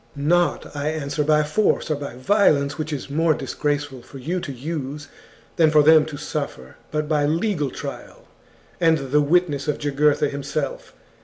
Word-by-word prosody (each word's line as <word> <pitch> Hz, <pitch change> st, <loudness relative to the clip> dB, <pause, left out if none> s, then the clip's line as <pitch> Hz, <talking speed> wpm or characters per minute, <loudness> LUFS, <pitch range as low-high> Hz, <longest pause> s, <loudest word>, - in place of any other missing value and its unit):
* -, -, -33 dB
Not. 170 Hz, +5 st, +1 dB
chap. -, -, -13 dB
XXXI 145 Hz, -, -5 dB
I 145 Hz, -, -2 dB
answer, 150 Hz, -1 st, -1 dB
by 150 Hz, 0 st, +3 dB
force 160 Hz, +2 st, +1 dB
or -, -, +2 dB
by 140 Hz, -4 st, -7 dB
violence, 145 Hz, -1 st, +2 dB
which 155 Hz, 0 st, -3 dB
it -, -, 0 dB
is 140 Hz, -, -7 dB
more 160 Hz, +1 st, +2 dB
disgraceful 145 Hz, -4 st, -3 dB
for 135 Hz, -, -12 dB
you 165 Hz, +8 st, -2 dB
to 150 Hz, -, -6 dB
use, 145 Hz, +1 st, -5 dB, 0.5 s
than 160 Hz, -2 st, +5 dB
for 150 Hz, -1 st, +5 dB
them 155 Hz, 0 st, +6 dB
to 150 Hz, -2 st, -7 dB
suffer, 140 Hz, -, -5 dB
but 150 Hz, 0 st, -2 dB
by 150 Hz, -2 st, +1 dB
legal 165 Hz, -2 st, 0 dB
trial, -, -, -8 dB, 0.5 s
and 165 Hz, -2 st, +4 dB
the 150 Hz, +1 st, +4 dB
witness 150 Hz, -2 st, +1 dB
of 150 Hz, -, 0 dB
Jugurtha 145 Hz, +1 st, +2 dB
himself. -, -, -4 dB
150 Hz, 185 wpm, -22 LUFS, 145-160 Hz, 0.5 s, them